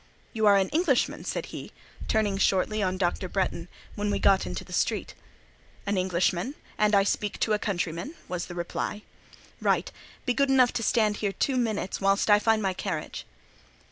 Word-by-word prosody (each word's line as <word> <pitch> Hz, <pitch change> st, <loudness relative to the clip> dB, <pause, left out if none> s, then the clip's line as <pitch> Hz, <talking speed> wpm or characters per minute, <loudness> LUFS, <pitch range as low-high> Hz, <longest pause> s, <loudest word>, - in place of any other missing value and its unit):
"You 220 Hz, -2 st, +2 dB
are 200 Hz, -1 st, +7 dB
an 190 Hz, -1 st, +1 dB
Englishman!" 310 Hz, -5 st, +1 dB
said -, -, -2 dB
he, -, -, -7 dB, 0.4 s
turning 210 Hz, -3 st, +1 dB
shortly 205 Hz, +3 st, +2 dB
on 185 Hz, -1 st, 0 dB
Dr. 185 Hz, 0 st, -1 dB
Bretton, 185 Hz, -3 st, -1 dB, 0.3 s
when 205 Hz, 0 st, -2 dB
we 200 Hz, -, +1 dB
got 195 Hz, -, +3 dB
into 90 Hz, -1 st, -4 dB
the -, -, -11 dB
street. -, -, 0 dB, 0.7 s
"An 205 Hz, -, 0 dB
Englishman. 185 Hz, -, 0 dB, 0.2 s
And 210 Hz, 0 st, +3 dB
I 200 Hz, -, +5 dB
speak 205 Hz, +1 st, -1 dB
to 220 Hz, -, +2 dB
a 210 Hz, -, +1 dB
countryman?" 180 Hz, -, -3 dB
was 180 Hz, -1 st, -4 dB
the 175 Hz, -, -8 dB
reply. 175 Hz, +4 st, -3 dB, 0.6 s
"Right. -, -, +1 dB, 0.3 s
Be 250 Hz, -, +2 dB
good 275 Hz, +3 st, +2 dB
enough 255 Hz, -2 st, +4 dB
to 240 Hz, -, -1 dB
stand 215 Hz, -2 st, +2 dB
here 205 Hz, -2 st, -1 dB
two 270 Hz, -, 0 dB
minutes, 220 Hz, -7 st, -1 dB
whilst 195 Hz, +2 st, +3 dB
I 205 Hz, -, +7 dB
find 220 Hz, 0 st, +2 dB
my 190 Hz, -1 st, +1 dB
carriage." 180 Hz, -5 st, -5 dB
205 Hz, 180 wpm, -27 LUFS, 185-220 Hz, 0.7 s, are